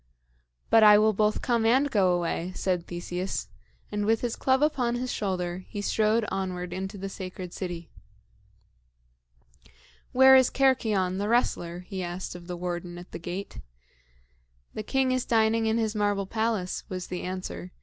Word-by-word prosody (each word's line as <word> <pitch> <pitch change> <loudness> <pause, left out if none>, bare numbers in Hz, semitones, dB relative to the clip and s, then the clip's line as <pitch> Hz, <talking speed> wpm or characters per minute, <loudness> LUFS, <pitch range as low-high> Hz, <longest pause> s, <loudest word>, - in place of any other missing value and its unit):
"But 225 - +7
I 210 -1 +9
will 215 +1 +4
both 210 +1 +1
come 235 -2 +1
and 260 +5 +3
go 185 -5 +3
away," 175 +1 -2
said 180 -3 -1
Theseus; 175 - -4 0.4
and 210 0 -1
with 225 +2 +2
his 240 -2 -2
club 265 +2 +2
upon 250 -6 +1
his 250 +1 -2
shoulder, 185 -2 -2
he 205 - -5
strode 215 +2 +1
onward 180 -2 -3
into 190 +2 -5
the 195 +1 -5
sacred 185 -2 -7
city. 175 -3 -6 2.2
"Where 265 +1 +7
is 260 -1 +6
Cercyon, 215 -9 +1
the 205 +1 -1
wrestler?" 175 -7 0
he 190 +1 -6
asked 175 +1 -5
of 175 -1 -11
the 180 -1 -5
warden 175 0 -4
at 175 +1 -11
the - - -6
gate. 180 +4 -6 1.1
"The - - -4
king 260 +4 +1
is 255 -1 +1
dining 225 0 +2
in 220 +1 +2
his 220 -2 0
marble 205 -2 0
palace," 220 -3 -1
was 185 -1 -4
the 180 - -5
answer. 185 0 -5
195 Hz, 160 wpm, -27 LUFS, 180-225 Hz, 2.2 s, I